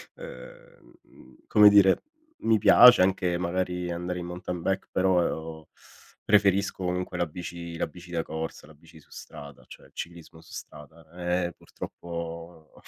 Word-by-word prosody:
ehm, 65 Hz, -, -13 dB
mhmm, 65 Hz, 0 st, -20 dB
come 105 Hz, -1 st, +7 dB
dire, 100 Hz, -2 st, +5 dB, 0.4 s
mi 110 Hz, -1 st, +2 dB
piace 120 Hz, +1 st, +8 dB
anche 90 Hz, -1 st, +1 dB
magari 90 Hz, 0 st, -2 dB
andare 90 Hz, +1 st, -4 dB
in 90 Hz, -, -6 dB
mountain 90 Hz, 0 st, -6 dB
bike, 95 Hz, +2 st, -2 dB
però 80 Hz, -4 st, -1 dB, 0.6 s
preferisco 100 Hz, -2 st, +2 dB
comunque 90 Hz, 0 st, -3 dB
la 85 Hz, -, +1 dB
bici 85 Hz, +1 st, -8 dB
la -, -, -1 dB
bici 90 Hz, 0 st, -14 dB
da 85 Hz, -2 st, -1 dB
corsa, 80 Hz, -1 st, -6 dB
la 80 Hz, -, -16 dB
bici 80 Hz, +1 st, -18 dB
su -, -, -24 dB
strada, 70 Hz, -2 st, -11 dB
cioè -, -, -14 dB
il -, -, -30 dB
ciclismo 85 Hz, -1 st, -9 dB
su -, -, -18 dB
strada. 80 Hz, 0 st, -11 dB
Eh 90 Hz, 0 st, -1 dB
eh 85 Hz, -, -9 dB
purtroppo, 85 Hz, -1 st, -9 dB
85 Hz, 155 wpm, -26 LUFS, 80-90 Hz, 0.6 s, piace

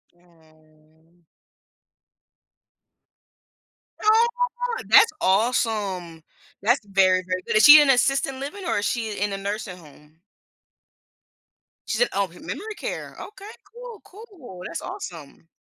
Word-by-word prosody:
Mm. 160 Hz, -1 st, -28 dB, 2.8 s
Aw, 475 Hz, +2 st, 0 dB
that's 415 Hz, -1 st, +6 dB
awesome. 195 Hz, -5 st, -1 dB, 0.4 s
That's 240 Hz, +7 st, +2 dB
very, 185 Hz, -2 st, +2 dB
very 185 Hz, 0 st, -2 dB
good, -, -, -1 dB
is 215 Hz, -, +4 dB
she 300 Hz, +1 st, +10 dB
in 290 Hz, -, +2 dB
assisted 270 Hz, +1 st, +2 dB
living 290 Hz, +9 st, -7 dB
or 330 Hz, -, 0 dB
is 205 Hz, -, -3 dB
she 225 Hz, -3 st, -2 dB
in 205 Hz, 0 st, -2 dB
a -, -, -3 dB
nursing 200 Hz, -2 st, -5 dB
home? 150 Hz, -1 st, -19 dB, 1.7 s
She's -, -, -2 dB
in 485 Hz, -, +4 dB
oh, 200 Hz, -1 st, 0 dB
me 175 Hz, +1 st, -17 dB
memory 430 Hz, +2 st, -7 dB
care, -, -, -7 dB
okay, 415 Hz, 0 st, -11 dB, 0.2 s
cool, 475 Hz, -2 st, -11 dB
cool, 365 Hz, -, -13 dB
that's 165 Hz, -, -6 dB
awesome. 165 Hz, -1 st, -9 dB
205 Hz, 120 wpm, -23 LUFS, -, 2.8 s, she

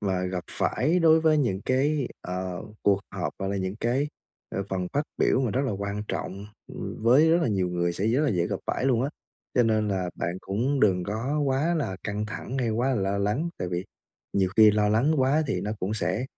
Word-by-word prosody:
mà 95 Hz, -3 st, 0 dB
gặp 90 Hz, -1 st, -3 dB
phải 160 Hz, +7 st, +1 dB
đối 160 Hz, -1 st, +5 dB
với 155 Hz, -1 st, +4 dB
những 100 Hz, -8 st, 0 dB
cái, 135 Hz, +1 st, +1 dB
ờ, 90 Hz, 0 st, -4 dB, 0.2 s
cuộc 100 Hz, -1 st, +3 dB
họp, -, -, -3 dB
gọi 95 Hz, -, -2 dB
là, 100 Hz, -, -1 dB
những 95 Hz, +2 st, -3 dB
cái 130 Hz, +5 st, +1 dB, 0.5 s
ờ 100 Hz, -, 0 dB
phần 95 Hz, -1 st, -2 dB
phát 145 Hz, -, +1 dB, 0.2 s
biểu 130 Hz, -, +3 dB
mà 125 Hz, -, 0 dB
rất 130 Hz, -, 0 dB
là 125 Hz, -, -1 dB
quan 100 Hz, +1 st, -3 dB
trọng, 100 Hz, +2 st, -4 dB, 0.3 s
ừm, -, -, -6 dB
với 140 Hz, +8 st, +6 dB
rất 170 Hz, 0 st, +4 dB
là -, -, +1 dB
nhiều 95 Hz, -4 st, +1 dB
người 85 Hz, 0 st, 0 dB
sẽ 100 Hz, +5 st, -2 dB
rất 125 Hz, +6 st, +2 dB
là 150 Hz, -, +2 dB
dễ 85 Hz, -3 st, +1 dB
gặp -, -, -2 dB
phải -, -, -1 dB
luôn 125 Hz, -3 st, +3 dB
á. 140 Hz, -, 0 dB, 0.5 s
Cho 120 Hz, -, +5 dB
nên 110 Hz, -2 st, +2 dB
là 90 Hz, -3 st, -1 dB
bạn 85 Hz, +2 st, -3 dB
cũng 125 Hz, +8 st, -1 dB
đừng 90 Hz, -4 st, +3 dB
có 115 Hz, +9 st, -2 dB
quá 140 Hz, +6 st, +1 dB
là 95 Hz, -, -2 dB
căng 105 Hz, 0 st, -2 dB
thẳng 120 Hz, +4 st, -5 dB
hay 120 Hz, -3 st, 0 dB
quá 120 Hz, +4 st, +1 dB
là 130 Hz, -, +2 dB
lo 100 Hz, 0 st, 0 dB
lắng, 105 Hz, +12 st, 0 dB
tại 90 Hz, -, -2 dB
vì 90 Hz, +1 st, -2 dB, 0.5 s
nhiều 95 Hz, -2 st, +2 dB
khi 110 Hz, -1 st, +8 dB
lo 105 Hz, 0 st, +2 dB
lắng 120 Hz, +9 st, +3 dB
quá 140 Hz, +4 st, +3 dB
thì -, -, -1 dB
nó 105 Hz, -, -3 dB
cũng 100 Hz, +4 st, -1 dB
sẽ 115 Hz, +3 st, -1 dB
110 Hz, 235 wpm, -26 LUFS, 95-135 Hz, 0.5 s, khi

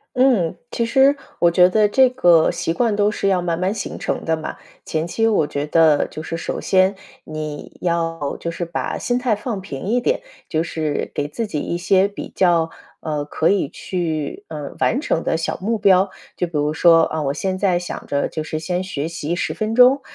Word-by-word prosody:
嗯， 245 Hz, -11 st, +3 dB
其 235 Hz, -, 0 dB
实， 270 Hz, +4 st, +4 dB, 0.2 s
我 175 Hz, -, +5 dB
觉 180 Hz, +1 st, +5 dB
得 210 Hz, +1 st, +3 dB
这 260 Hz, +4 st, +4 dB
个 175 Hz, -11 st, +4 dB
习 165 Hz, -, -2 dB
惯 225 Hz, 0 st, +1 dB
都 205 Hz, 0 st, +3 dB
是 200 Hz, -1 st, -1 dB
要 185 Hz, -2 st, +2 dB
慢 170 Hz, -2 st, -1 dB
慢 185 Hz, +3 st, 0 dB
形 -, -, -5 dB
成 -, -, -3 dB
的 160 Hz, 0 st, +1 dB
嘛。 155 Hz, 0 st, -6 dB, 0.3 s
前 160 Hz, +1 st, -2 dB
期 225 Hz, +6 st, 0 dB
我 205 Hz, -9 st, +2 dB
觉 145 Hz, +1 st, -3 dB
得 155 Hz, -1 st, +4 dB
就 155 Hz, -, -7 dB
是 165 Hz, -, -5 dB
首 165 Hz, -, -4 dB
先， 190 Hz, +1 st, +3 dB, 0.3 s
你 155 Hz, -1 st, -7 dB
要 165 Hz, -4 st, -1 dB
就 170 Hz, -, -4 dB
是 170 Hz, +1 st, -4 dB
把 170 Hz, 0 st, -3 dB
心 245 Hz, -, -1 dB
态 250 Hz, -3 st, +1 dB
放 210 Hz, -2 st, -4 dB
平 160 Hz, -5 st, -7 dB
一 240 Hz, +4 st, +1 dB
点， -, -, 0 dB, 0.3 s
就 160 Hz, +1 st, 0 dB
是 155 Hz, -3 st, -2 dB
给 145 Hz, 0 st, -2 dB
自 220 Hz, +9 st, -3 dB
己 150 Hz, -, -3 dB
一 170 Hz, -, -2 dB
些 190 Hz, +2 st, +3 dB
比 200 Hz, -, -7 dB
较， 170 Hz, -3 st, +3 dB, 0.3 s
呃， 150 Hz, -2 st, -3 dB
可 155 Hz, +2 st, -1 dB
以 190 Hz, -8 st, +1 dB
去， 160 Hz, -5 st, -3 dB
呃， 150 Hz, -3 st, -6 dB
完 255 Hz, -, +2 dB
成 165 Hz, -, -1 dB
的 165 Hz, -, 0 dB
小 165 Hz, -, -2 dB
目 225 Hz, +3 st, 0 dB
标。 195 Hz, -2 st, +4 dB, 0.3 s
就 180 Hz, -, -1 dB
比 170 Hz, -, -12 dB
如 150 Hz, +1 st, 0 dB
说， 165 Hz, +1 st, +5 dB
啊， 160 Hz, -1 st, -1 dB
我 140 Hz, 0 st, 0 dB
现 185 Hz, +4 st, -2 dB
在 185 Hz, -3 st, +2 dB
想 175 Hz, -, -6 dB
着 140 Hz, 0 st, 0 dB
就 155 Hz, -, -4 dB
是 155 Hz, 0 st, -4 dB
先 180 Hz, +3 st, -2 dB
学 160 Hz, -5 st, -3 dB
习 165 Hz, 0 st, -4 dB
10 -, -, -1 dB
分 215 Hz, 0 st, -2 dB
钟， 250 Hz, +3 st, +6 dB
175 Hz, 225 characters per minute, -20 LUFS, 160-205 Hz, 0.3 s, 钟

